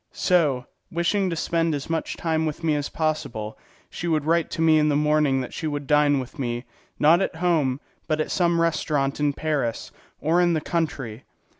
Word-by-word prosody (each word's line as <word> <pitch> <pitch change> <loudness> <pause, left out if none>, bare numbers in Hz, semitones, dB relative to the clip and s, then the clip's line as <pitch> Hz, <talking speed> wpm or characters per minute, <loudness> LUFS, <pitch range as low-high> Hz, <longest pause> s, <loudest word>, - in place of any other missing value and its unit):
So, 150 -9 +2 0.2
wishing 185 +3 0
to 170 - -2
spend 165 -1 0
as 140 - -5
much 165 0 -2
time 160 -1 0
with 155 +2 -5
me 160 -2 +2
as 145 0 -2
possible, 140 -9 -2 0.4
she 170 - -5
would 155 -3 +1
write 165 +1 +2
to 165 - -4
me 160 -1 +5
in 150 0 +3
the 145 - +2
morning 150 -2 +2
that 125 - -7
she 160 - -3
would 145 -1 -3
dine 145 -1 +3
with 130 +4 -8
me, 120 -1 -3 0.3
not 165 +5 +5
at 190 - -1
home, 160 -6 +1 0.3
but 155 -1 0
at 155 - -1
some 170 -2 +2
restaurant 150 -4 0
in 145 -1 +2
Paris 140 -6 -2 0.3
or 165 +3 +2
in 175 -1 +3
the 160 - +1
country. 135 -9 -3
155 Hz, 195 wpm, -24 LUFS, 140-165 Hz, 0.4 s, me